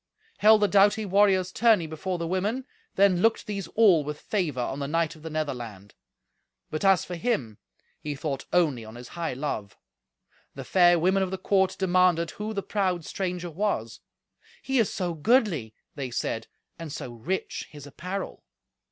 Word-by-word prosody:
Held 215 0 +6
the - - +5
doughty 205 +2 +4
warriors 190 -2 +3
tourney 215 -4 +3
before 160 +4 -4
the 170 - -3
women, 200 +9 -1 0.3
then 190 -2 +4
looked 225 +2 +2
these 200 -4 -4
all 195 -9 +5
with 150 +1 -5
favour 170 -11 -2
on 135 +3 -2
the 140 - -3
knight 165 +2 0
of 155 - -16
the 160 - -6
Netherland. 120 -10 -5 0.8
But, 155 - -3
as 195 -3 +4
for 180 - -7
him, 165 - -2 0.4
he 150 -1 -4
thought 135 -1 -4
only 150 -10 +2
on 110 +1 -11
his 120 0 -10
high 170 -4 -3
love. 125 -7 -4 0.8
The - - -6
fair 175 -2 +5
women 185 +4 +2
of 190 - 0
the 190 - -3
court 190 0 +1
demanded 180 -3 +2
who 210 +1 -5
the 200 -3 -3
proud 185 -5 -1
stranger 180 -2 -3
was. 155 - -2 0.6
"He 270 -1 +1
is 225 - +2
so 180 -3 -2
goodly," 160 - +1 0.2
they 135 -3 -5
said, 115 -1 -3 0.3
"and 165 -3 -6
so 130 -4 -6
rich 165 +12 -4
his 145 -2 -11
apparel." 180 +7 -6
175 Hz, 170 wpm, -26 LUFS, 150-195 Hz, 0.8 s, Held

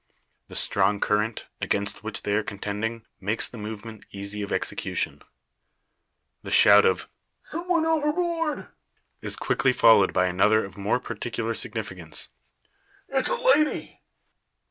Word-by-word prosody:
The - - -11
strong 100 +1 +2
current, 105 +2 0 0.2
against 100 +1 -1
which 110 -1 -5
they 100 - -1
are 105 - +3
contending, 105 +3 -4
makes 105 +3 -1
the 120 - -10
movement 110 +1 -7
easy 100 +1 -5
of 100 - -5
execution. - - -2 1.2
The - - -8
shout 105 0 +7
of, 95 -2 +1 0.4
"some 340 +3 -5
one 335 -3 +2
overboard!" 325 0 0 0.5
is - - +1
quickly 130 - +1
followed 110 -5 +6
by 90 - +2
another 105 +4 +3
of 95 - -11
more 100 +4 0
particular - - -4
significance. - - -5 0.8
"It's - - 0
a - - +1
lady!" 485 -11 +2
110 Hz, 130 wpm, -26 LUFS, -, 1.2 s, shout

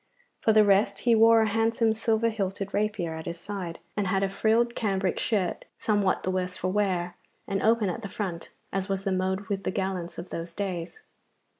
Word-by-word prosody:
For 220 - +3
the 215 -1 +6
rest, 200 0 +3
he 240 - +4
wore 225 0 +6
a - - +1
handsome 225 +1 +2
silver 225 +1 +1
hilted 195 -2 -3
rapier 205 -5 -1
at 160 +1 -7
his 170 0 -5
side, 185 -5 -5 0.2
and 205 -2 0
had 190 +1 +1
a 195 - +1
frilled 225 +4 +2
cambric 195 -5 0
shirt 200 -7 -1
somewhat 205 -3 +1
the 185 - 0
worse 185 0 -2
for 185 - -1
wear 185 -3 0 0.3
and 195 0 -1
open 225 -1 +3
at 230 +6 -3
the 200 - -6
front, 185 -5 -4 0.2
as 195 +1 -2
was 195 0 -1
the 195 - 0
mode 190 +1 0
with 195 -1 -4
the - - -1
gallants 190 -2 -3
of 175 - -7
those 170 0 -5
days. 190 - -4
195 Hz, 200 wpm, -27 LUFS, 185-220 Hz, 0.3 s, the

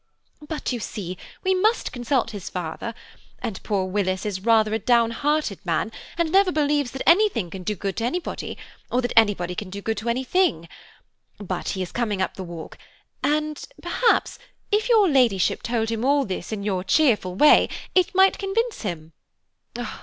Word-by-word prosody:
"But, 310 -3 -3
you 245 - -2
see, 195 -5 -5 0.3
we 380 - +3
must 430 +5 +1
consult 245 -1 0
his 205 -4 -7
father, 180 +6 -5 0.4
and 225 -6 -5
poor 200 -3 -1
Willis 185 0 -1
is 195 -3 -3
rather 220 0 +3
a 220 - +1
down 235 +1 +3
hearted 295 -5 -1
man, 175 +5 -1 0.3
and 335 -2 0
never 385 0 +4
believes 290 -3 +1
that 270 +1 -5
anything 335 - +4
can 190 - -7
do 210 +4 -2
good 195 +1 -4
to 225 - -1
anybody, 340 +8 -3 0.3
or 250 - +2
that 245 - -2
anybody 205 -6 +3
can 185 +2 -5
do 200 +2 -6
good 220 +1 -2
to 220 +3 -3
anything. 260 - +1 0.7
But 185 -3 -4
he 190 - -1
is 180 - -8
coming 215 -5 -1
up 185 - -1
the 190 - -7
walk, 170 -3 -9 0.4
and, 305 0 0 0.2
perhaps, 475 - +1 0.3
if 425 +3 +1
your 435 -4 +6
Ladyship 245 - +3
told 225 -1 -1
him 225 0 -2
all 280 +1 +3
this 190 +2 -5
in 210 -2 -3
your 190 -3 -1
cheerful 210 - +2
way 300 +9 +6 0.2
it 370 0 +2
might 385 +1 +5
convince 440 +4 -1
him. 165 -6 -5
230 Hz, 175 wpm, -24 LUFS, 190-300 Hz, 0.7 s, your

